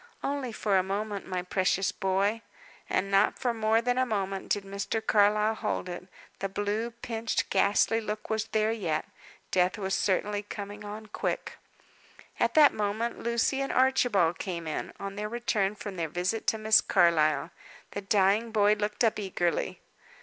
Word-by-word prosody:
"Only 275 Hz, -3 st, -2 dB
for 205 Hz, -3 st, +1 dB
a -, -, +3 dB
moment, 200 Hz, +2 st, -3 dB
my 185 Hz, -1 st, -2 dB
precious 190 Hz, +1 st, +1 dB
boy." 200 Hz, +3 st, 0 dB, 0.5 s
And 195 Hz, +1 st, 0 dB
not 195 Hz, +1 st, +3 dB
for 245 Hz, -2 st, 0 dB
more 225 Hz, 0 st, +2 dB
than 245 Hz, +1 st, +1 dB
a -, -, +4 dB
moment 195 Hz, -3 st, -2 dB
did 205 Hz, -, 0 dB
Mr. 200 Hz, +3 st, -3 dB
Carlyle 210 Hz, +1 st, +3 dB
hold 215 Hz, -4 st, -3 dB
it. 180 Hz, 0 st, -7 dB, 0.3 s
The 195 Hz, -, -2 dB
blue, 205 Hz, +4 st, -2 dB
pinched, 230 Hz, -1 st, -3 dB
ghastly 225 Hz, +2 st, +3 dB
look 215 Hz, 0 st, -5 dB
was 220 Hz, -1 st, -1 dB
there 215 Hz, 0 st, +1 dB
yet. 180 Hz, -9 st, -1 dB, 0.5 s
Death 180 Hz, +2 st, +2 dB
was 195 Hz, -2 st, -2 dB
certainly 205 Hz, +2 st, 0 dB
coming 205 Hz, 0 st, -7 dB
on 210 Hz, +1 st, -7 dB
quick. 210 Hz, -, -4 dB, 0.8 s
At -, -, +1 dB
that 300 Hz, -2 st, +7 dB
moment 215 Hz, +3 st, -2 dB
Lucy 235 Hz, +3 st, 0 dB
and 275 Hz, -, -2 dB
Archibald 245 Hz, -10 st, +3 dB
came 175 Hz, -4 st, -4 dB
in, 155 Hz, -, -4 dB
on 195 Hz, 0 st, -6 dB
their 210 Hz, 0 st, -3 dB
return 215 Hz, -4 st, 0 dB
from 205 Hz, -2 st, -7 dB
their 165 Hz, -2 st, -2 dB
visit 180 Hz, +7 st, -2 dB
to 220 Hz, -, +2 dB
Miss 215 Hz, 0 st, +5 dB
Carlyle. 155 Hz, -2 st, +3 dB, 0.4 s
The 200 Hz, -, -4 dB
dying 200 Hz, +2 st, +2 dB
boy 210 Hz, -1 st, +4 dB
looked 210 Hz, +2 st, -1 dB
up 225 Hz, -2 st, +2 dB
eagerly. 175 Hz, -4 st, -1 dB
205 Hz, 165 wpm, -28 LUFS, 195-220 Hz, 0.8 s, that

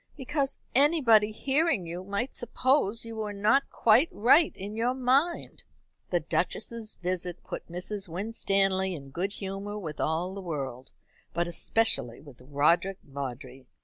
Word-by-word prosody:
"Because 275 Hz, 0 st, -1 dB, 0.2 s
anybody 255 Hz, -7 st, +4 dB
hearing 270 Hz, -, 0 dB
you 175 Hz, +2 st, -6 dB
might 200 Hz, +7 st, -3 dB
suppose 240 Hz, -2 st, 0 dB
you 225 Hz, -1 st, -8 dB
were 210 Hz, -1 st, -3 dB
not 215 Hz, +7 st, +2 dB
quite 235 Hz, +8 st, +4 dB
right 280 Hz, +9 st, +4 dB
in 200 Hz, +3 st, -7 dB
your 240 Hz, +3 st, 0 dB
mind." 270 Hz, +7 st, 0 dB, 0.5 s
The -, -, +1 dB
Duchess's 230 Hz, -2 st, -3 dB
visit 180 Hz, -1 st, -4 dB
put -, -, -8 dB
Mrs. 190 Hz, +2 st, -5 dB
Winstanley 195 Hz, 0 st, 0 dB
in 140 Hz, -3 st, -10 dB
good 185 Hz, +7 st, -2 dB
humour 200 Hz, +1 st, -5 dB
with 160 Hz, -7 st, -7 dB
all 170 Hz, +4 st, -1 dB
the 200 Hz, -, -6 dB
world, 135 Hz, -7 st, -5 dB, 0.4 s
but 170 Hz, 0 st, 0 dB
especially 170 Hz, -, +3 dB
with 140 Hz, -4 st, -15 dB
Roderick 150 Hz, +8 st, +1 dB
Vawdrey. 135 Hz, -1 st, -7 dB
200 Hz, 140 wpm, -28 LUFS, 170-235 Hz, 0.5 s, anybody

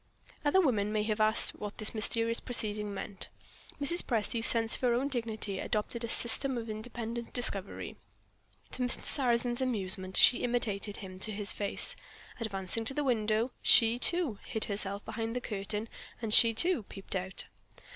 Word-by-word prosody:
Other 295 Hz, +6 st, +3 dB
women 215 Hz, -, +1 dB
might 215 Hz, -1 st, -1 dB
have 215 Hz, 0 st, -2 dB
asked 215 Hz, +1 st, +3 dB
what 205 Hz, -1 st, -7 dB
this 215 Hz, -, 0 dB
mysterious 230 Hz, +1 st, -1 dB
proceeding 210 Hz, -4 st, -1 dB
meant. 200 Hz, -1 st, -4 dB, 0.5 s
Mrs. 315 Hz, +5 st, +5 dB
Presty's 230 Hz, -1 st, 0 dB
sense 225 Hz, -1 st, +5 dB
of -, -, +1 dB
her 245 Hz, -2 st, +2 dB
own 270 Hz, +4 st, -1 dB
dignity 220 Hz, -6 st, -3 dB
adopted 220 Hz, +2 st, -3 dB
a 235 Hz, -, -4 dB
system 245 Hz, +3 st, +2 dB
of 225 Hz, -1 st, -5 dB
independent 235 Hz, +1 st, -6 dB
discovery. 200 Hz, -6 st, -2 dB, 0.7 s
To -, -, -3 dB
Mr. 245 Hz, -1 st, +2 dB
Sarrazin's 240 Hz, -2 st, +4 dB
amusement, 190 Hz, -6 st, -1 dB
she 250 Hz, -, +6 dB
imitated 215 Hz, -4 st, -1 dB
him 185 Hz, -1 st, -10 dB
to 215 Hz, -, -1 dB
his 205 Hz, 0 st, -2 dB
face. 200 Hz, -1 st, +1 dB, 0.4 s
Advancing 200 Hz, -1 st, -3 dB
to 270 Hz, -, -3 dB
the 295 Hz, -, -1 dB
window, 225 Hz, -1 st, 0 dB
she, 230 Hz, +1 st, +6 dB
too, 330 Hz, -, +1 dB
hid 220 Hz, -, -4 dB
herself 200 Hz, 0 st, -3 dB
behind 225 Hz, +1 st, -5 dB
the -, -, -1 dB
curtain, 210 Hz, -1 st, -4 dB, 0.3 s
and 225 Hz, -2 st, -4 dB
she, 230 Hz, 0 st, +7 dB
too, 350 Hz, +3 st, +1 dB
peeped 195 Hz, -1 st, -7 dB
out. 190 Hz, 0 st, -3 dB
225 Hz, 165 wpm, -30 LUFS, 210-240 Hz, 0.7 s, she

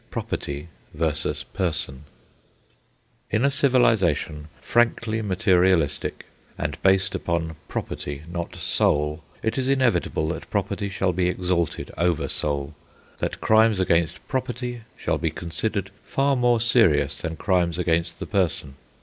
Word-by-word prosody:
PROPERTY 70 Hz, +3 st, -4 dB, 0.3 s
VERSUS 80 Hz, -1 st, -1 dB
PERSON 75 Hz, -6 st, -1 dB, 1.2 s
In 110 Hz, +5 st, +2 dB
a 140 Hz, -, +3 dB
civilisation 115 Hz, -, +2 dB
frankly 115 Hz, -2 st, +1 dB
materialistic 95 Hz, -6 st, +2 dB, 0.3 s
and 75 Hz, +1 st, -3 dB
based 95 Hz, 0 st, +3 dB
upon 80 Hz, -2 st, -2 dB
property, 70 Hz, +1 st, -4 dB
not 85 Hz, 0 st, -5 dB
soul, 75 Hz, +1 st, +1 dB, 0.2 s
it 110 Hz, +4 st, 0 dB
is 130 Hz, -, 0 dB
inevitable 130 Hz, -, +1 dB
that 80 Hz, -, -5 dB
property 100 Hz, -, -1 dB
shall 95 Hz, -1 st, 0 dB
be 90 Hz, 0 st, +1 dB
exalted 90 Hz, -3 st, -1 dB
over 85 Hz, -2 st, +1 dB
soul, 70 Hz, -1 st, -2 dB, 0.5 s
that -, -, -3 dB
crimes 110 Hz, -2 st, +4 dB
against 85 Hz, -3 st, +1 dB
property 125 Hz, -2 st, -3 dB, 0.2 s
shall -, -, -1 dB
be -, -, 0 dB
considered 100 Hz, +4 st, -3 dB
far 140 Hz, 0 st, +1 dB
more 120 Hz, -2 st, +3 dB
serious 80 Hz, -, +3 dB
than 80 Hz, -1 st, -4 dB
crimes 85 Hz, -2 st, +1 dB
against 85 Hz, -1 st, 0 dB
the -, -, -5 dB
person. 80 Hz, -8 st, -1 dB
90 Hz, 125 wpm, -24 LUFS, 80-110 Hz, 1.2 s, crimes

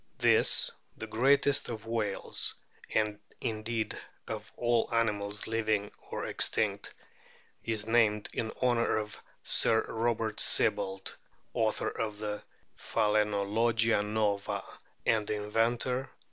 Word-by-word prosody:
This, -, -, +4 dB, 0.3 s
the 110 Hz, -, -4 dB
greatest 135 Hz, +5 st, +3 dB
of 115 Hz, -2 st, -6 dB
whales, 110 Hz, -3 st, -1 dB, 0.3 s
and 105 Hz, -1 st, 0 dB, 0.2 s
indeed 110 Hz, 0 st, -2 dB, 0.3 s
of -, -, -6 dB
all 120 Hz, -1 st, +2 dB
animals 105 Hz, -3 st, 0 dB
living 110 Hz, -2 st, 0 dB, 0.2 s
or -, -, -3 dB
extinct, -, -, +1 dB
f -, -, -27 dB, 0.6 s
is 110 Hz, -2 st, -1 dB
named 110 Hz, -2 st, +3 dB
in 110 Hz, -, -2 dB
honour 120 Hz, -3 st, +2 dB
of 105 Hz, -1 st, -5 dB, 0.2 s
Sir 110 Hz, -, +3 dB
Robert 115 Hz, -1 st, -1 dB
Sibbald, 95 Hz, 0 st, +1 dB, 0.4 s
author 110 Hz, -1 st, +1 dB
of 105 Hz, -2 st, -3 dB
the 105 Hz, 0 st, -4 dB, 0.4 s
Phalainologia 105 Hz, +2 st, +2 dB
nova 105 Hz, -1 st, -1 dB, 0.4 s
and 110 Hz, -2 st, +2 dB
inventor 115 Hz, +5 st, 0 dB
110 Hz, 105 wpm, -31 LUFS, 105-115 Hz, 0.6 s, This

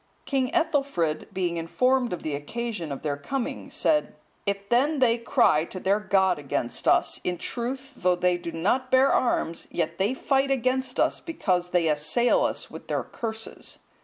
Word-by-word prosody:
King 265 Hz, -2 st, 0 dB
Ethelfrid 280 Hz, -, 0 dB
being 175 Hz, -2 st, -1 dB
informed 250 Hz, +9 st, +1 dB
of 180 Hz, -, -4 dB
the 155 Hz, -, -2 dB
occasion 175 Hz, +3 st, -4 dB
of 140 Hz, -, -6 dB
their 145 Hz, -2 st, -1 dB
coming, 255 Hz, -, -4 dB
said, 300 Hz, -1 st, +1 dB, 0.3 s
"If 200 Hz, 0 st, -2 dB
then 280 Hz, +6 st, +3 dB
they 240 Hz, -3 st, +3 dB
cry 155 Hz, -9 st, +3 dB
to 185 Hz, -, -7 dB
their 195 Hz, +3 st, +2 dB
God 190 Hz, -4 st, +2 dB
against 135 Hz, -4 st, -2 dB
us, -, -, +3 dB
in 180 Hz, -1 st, -1 dB
truth, 260 Hz, +6 st, -4 dB
though 180 Hz, -5 st, +2 dB
they 180 Hz, 0 st, +2 dB
do 170 Hz, -1 st, -5 dB
not 245 Hz, +11 st, 0 dB
bear 260 Hz, +1 st, +5 dB
arms, 170 Hz, -9 st, 0 dB
yet 170 Hz, +1 st, -2 dB
they 205 Hz, +7 st, +1 dB
fight 270 Hz, +1 st, +1 dB
against 260 Hz, 0 st, 0 dB
us, -, -, +2 dB
because 185 Hz, -, -1 dB
they 175 Hz, -2 st, +2 dB
assail 155 Hz, +11 st, +2 dB
us -, -, -2 dB
with -, -, -10 dB
their -, -, -1 dB
curses." 225 Hz, -1 st, -5 dB
205 Hz, 170 wpm, -26 LUFS, 170-260 Hz, 0.3 s, bear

